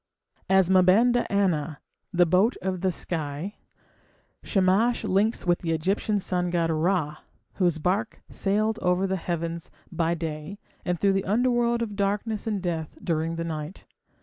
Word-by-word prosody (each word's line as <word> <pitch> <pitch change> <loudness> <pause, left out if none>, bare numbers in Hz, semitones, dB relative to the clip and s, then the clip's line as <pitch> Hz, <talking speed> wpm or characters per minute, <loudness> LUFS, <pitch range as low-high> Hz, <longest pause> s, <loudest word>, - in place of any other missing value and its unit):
As 190 -2 +5
Ma 185 -1 +6
banda 235 +7 +3
anna, 170 -7 0 0.3
"the 175 -2 +4
boat 185 +8 +3
of 185 -2 -2
the 190 -1 +2
sky", 160 +2 -4 0.8
Shamash 200 +5 +2
links 210 +2 +1
with 175 -1 +2
the 165 -2 -1
Egyptian 195 +6 0
sun 180 -2 -1
god 170 -2 +1
Ra, 160 -2 0 0.4
whose 175 -4 +2
barque 195 +7 -1
sailed 215 +3 0
over 180 +1 +2
the 190 0 0
heavens 170 -1 -4 0.2
by 170 0 0
day 160 +3 -5 0.3
and 180 -2 -1
through 200 -1 +3
the 195 0 0
underworld 235 +2 +2
of 210 -3 -5
darkness 205 +2 -1
and 205 -4 -1
death 165 -3 -3
during 165 0 -1
the 165 - -3
night. 155 +1 -6
185 Hz, 150 wpm, -26 LUFS, 165-205 Hz, 0.8 s, Ma